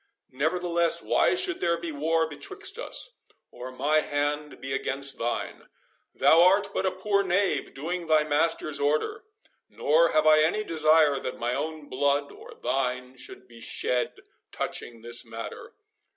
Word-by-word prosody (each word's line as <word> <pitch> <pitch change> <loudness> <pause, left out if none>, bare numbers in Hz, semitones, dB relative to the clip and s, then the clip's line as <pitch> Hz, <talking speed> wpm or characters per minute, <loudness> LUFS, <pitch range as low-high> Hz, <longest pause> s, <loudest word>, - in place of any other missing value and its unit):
Nevertheless, 170 +4 +1
why - - +2
should 370 -1 0
there 170 0 +1
be 170 -1 -5
war 160 +2 +1
betwixt 145 -2 -7
us, - - -3 0.4
or 130 +1 -8
my 145 +4 +2
hand 145 0 -2
be 135 0 -5
against 140 +1 -1
thine? 120 +1 -3 0.5
Thou 165 - +5
art 195 +3 +4
but - - 0
a - - +1
poor 200 +2 0
knave, 185 -5 0
doing 170 +5 -4
thy 155 -1 +4
master's 155 0 0
order, 155 - 0 0.4
nor 165 +3 +3
have 155 0 +2
I 155 0 +6
any 175 +8 +1
desire 155 -4 +3
that 125 - -5
my 120 +1 -2
own 155 +2 -4
blood 140 +2 0
or - - -13
thine 125 -1 -2
should 130 0 -11
be 115 -1 -15
shed 125 +2 -1 0.4
touching 115 -2 -5
this 120 +1 -1
matter. 115 0 -8
150 Hz, 150 wpm, -27 LUFS, 135-170 Hz, 0.5 s, I